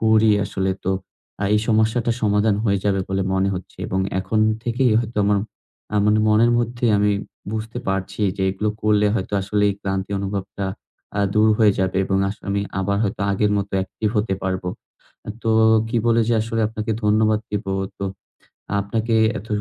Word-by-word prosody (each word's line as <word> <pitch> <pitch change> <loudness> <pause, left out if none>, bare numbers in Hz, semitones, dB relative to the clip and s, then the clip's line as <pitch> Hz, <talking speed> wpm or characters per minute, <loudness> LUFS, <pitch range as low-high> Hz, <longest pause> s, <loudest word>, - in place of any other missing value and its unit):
করি 110 0 +4
আসলে, 95 -1 -1
তো 95 - +1 0.5
আ - - +1
এই 105 - +3
সমস্যাটা 110 +1 +2
সমাধান 105 0 +3
হয়ে 100 -2 +2
যাবে 100 -2 +2
বলে 95 0 0
মনে 95 +1 +2
হচ্ছে। 90 -1 -8
এবং 95 - -1 0.2
এখন 105 +3 0 0.2
থেকেই 120 0 +2
হয়তো 115 -1 -6
আমার, 100 0 +3 0.6
আ - - +3
মানে 105 +1 +4
মনের 110 +2 +4
মধ্যেই 120 0 0
আমি 105 0 +3 0.4
বুঝতে 110 +2 -4
পারছি 95 +1 -2 0.2
যে, 95 - -2
এগুলো 105 +3 -1
করলে 105 -1 +3
হয়তো 95 -3 -3
আসলে 105 +2 0
এই 100 - -3
ক্লান্তি 95 0 -3
অনুভবটা 100 0 -4 0.5
আ - - +2
দূর 105 +1 +5
হয়ে 110 -3 +5
যাবে। 95 0 0
এবং 95 0 0
আসলে 100 - -8
আমি 100 0 0 0.2
আবার 100 +1 0
হয়তো 100 - -3
আগের 105 +1 +1
মতো 100 0 -3
অ্যাকটিভ 95 +3 -2
হতে 105 -2 0
পারবো। 95 -1 -2 0.7
তো 115 - +1 0.4
কি 120 - -2
বলে 115 0 +4
যে, 120 - +3
আসলে 115 0 -2
আপনাকে 110 0 -3
ধন্যবাদ 110 0 +3
দিব। 105 0 -2 0.3
তো 100 - -3 0.8
আপনাকে 110 +3 -1 0.2
এত 100 - -10
105 Hz, 175 wpm, -21 LUFS, 95-110 Hz, 0.8 s, দূর